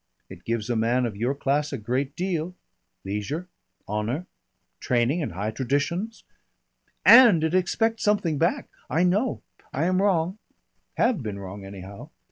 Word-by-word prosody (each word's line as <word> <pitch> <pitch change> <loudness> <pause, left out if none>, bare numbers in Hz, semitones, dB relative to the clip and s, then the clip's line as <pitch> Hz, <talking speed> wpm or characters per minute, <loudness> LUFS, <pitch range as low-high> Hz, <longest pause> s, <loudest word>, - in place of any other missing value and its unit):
It 90 -2 -12
gives 115 -2 -2
a - - +1
man 120 +3 +2
of 110 -4 -4
your 120 +7 -1
class 145 +1 0
a 135 - -3
great 130 +6 -2
deal. 180 -1 -2 0.5
Leisure. 105 - -3 0.4
Honour. 110 - -2 0.5
Training 125 +7 +1
and 140 - -3
high 100 +5 -2
traditions 145 - -2 0.4
" - - -45
"And 225 -11 +8
it 160 +1 0
expects 225 +5 +1
something 180 -8 +1
back. 170 +2 +1 0.2
I 165 +3 +2
know. 205 +7 +1 0.3
I 140 - -1
am 185 +1 +2
wrong 190 0 +1 0.6
have 230 - +2
been 105 -4 -5
wrong 100 0 -8
anyhow. 95 0 -10
140 Hz, 150 wpm, -25 LUFS, 110-180 Hz, 0.6 s, And